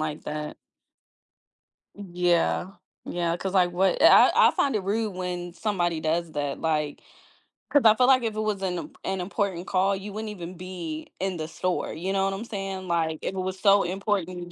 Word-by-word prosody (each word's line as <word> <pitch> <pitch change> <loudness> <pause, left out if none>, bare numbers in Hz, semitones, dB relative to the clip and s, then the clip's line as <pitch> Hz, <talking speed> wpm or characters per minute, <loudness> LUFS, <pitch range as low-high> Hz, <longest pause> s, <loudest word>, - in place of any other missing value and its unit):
like 155 -1 -4
that. 150 0 -5 1.4
Yeah, 180 -2 0 0.3
yeah, 170 -1 -1
‘cause 190 +1 -4
like 180 -2 +4
what 190 +1 +1
i - - +9 0.2
I - - +5
I - - +3
find 275 -3 +1
it 210 - 0
rude 215 +3 -1
when 180 -1 -4
somebody 175 -6 -1
does 160 +1 -1
that, 145 -1 -3
like, 150 -2 -1 0.7
‘cause 290 -3 +4
I 215 - +9
feel 250 +2 +3
like 255 -2 +5
if 225 -2 -2
it - - -3
was 210 -2 -1
an 180 -2 -1
im 155 -1 -8
an 190 -1 -2
important 185 -1 -2
call, 195 +1 +2
you 200 +2 -7
wouldn't 215 +1 -4
even 180 -3 -8
be 175 -4 -6
in 190 -1 -2
the 155 -1 -4
store, 185 +2 -2
you 180 +5 -3
know 195 0 +2
what 195 - 0
I'm 205 +4 -5
saying? 195 -3 -5
Like 160 -2 0
if 190 - -3
it - - -6
was 185 0 -3
so 200 0 +5
important, 180 -2 -2
185 Hz, 200 wpm, -26 LUFS, 170-200 Hz, 1.4 s, i